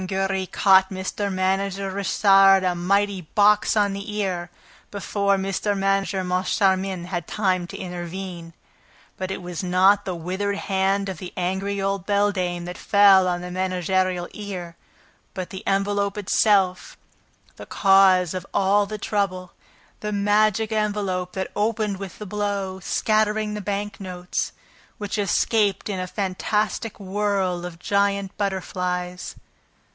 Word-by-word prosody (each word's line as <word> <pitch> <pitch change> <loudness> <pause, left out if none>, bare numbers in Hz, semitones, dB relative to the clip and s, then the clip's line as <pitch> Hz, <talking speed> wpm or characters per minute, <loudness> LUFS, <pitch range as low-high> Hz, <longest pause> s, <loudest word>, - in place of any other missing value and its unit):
Giry 190 0 -1
caught 190 -1 +4
Mr. 190 +1 -3
Manager 195 +1 -1
Richard 195 0 +5
a 180 -1 +1
mighty 195 +2 +1
box 210 +6 +3
on 205 -1 +2
the 200 +2 -6
ear, 185 -4 -2 0.4
before 200 0 0
Mr. 195 +1 -1
Manager 195 0 0
Moncharmin 185 0 0
had 175 -2 -4
time 185 -4 0
to - - -8
intervene. 175 -1 -6 0.6
But 185 0 -4
it 190 -1 -5
was 175 -2 -5
not 190 +3 +4
the 185 - -3
withered 190 +4 -2
hand 195 0 0
of 190 -4 -5
the 180 - -7
angry 190 +3 -2
old 195 -1 -2
beldame 195 -4 0
that 180 0 -7
fell 200 -2 +5
on 175 -1 -1
the 180 0 -7
managerial 185 0 0
ear, 185 -5 -7 0.6
but 185 -1 -5
the 190 - -6
envelope 200 +1 0
itself, 195 -2 +2 0.6
the - - -10
cause 190 -3 +4
of 185 - -4
all 200 +1 +3
the 215 +1 -5
trouble, 195 -3 -2 0.5
the 210 - -4
magic 210 +1 +2
envelope 200 -4 -1
that 190 0 -4
opened 210 -1 0
with 195 -2 -8
the 210 - -7
blow, 200 -2 -3
scattering 215 +2 0
the 210 - -4
bank 205 +1 -3
notes, 180 -2 -4 0.5
which 205 0 -4
escaped 205 +1 +1
in 195 -2 -2
a 185 - -3
fantastic 210 +3 -2
whirl 190 -3 -1
of 170 -1 -10
giant 200 +1 0
butterflies. 180 -2 -3
195 Hz, 135 wpm, -23 LUFS, 185-205 Hz, 0.6 s, Richard